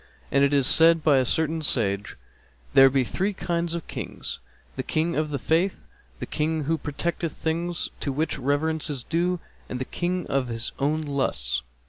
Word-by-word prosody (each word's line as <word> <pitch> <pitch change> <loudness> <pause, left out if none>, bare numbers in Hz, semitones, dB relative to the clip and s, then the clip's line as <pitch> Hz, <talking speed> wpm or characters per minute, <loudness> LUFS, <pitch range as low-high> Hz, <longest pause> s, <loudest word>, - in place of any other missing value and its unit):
And 140 - +4
it 140 - +3
is 140 -2 +4
said 165 +2 +7
by 145 -4 +5
a 130 - +1
certain 160 +4 0
sage, 105 -8 0 0.6
'There 135 0 +8
be 135 0 +2
three 190 - -1
kinds 170 -2 -2
of 170 - -5
Kings, - - -6 0.4
the - - -2
King 165 +2 -1
of 155 0 0
the 145 - -2
Faith, 165 - 0 0.3
the - - -5
King 155 0 -1
who 160 +3 0
protecteth 165 +2 -3
things 170 +1 -2
to 140 - -2
which 150 +4 -1
reverence 150 +4 +1
is 135 -5 -4
due, 175 +4 0 0.3
and 125 - -3
the 130 - -3
King 180 +3 -2
of 135 -2 0
his 115 -1 -2
own 150 +3 +1
lusts.' 135 - -1
155 Hz, 180 wpm, -25 LUFS, 135-165 Hz, 0.6 s, There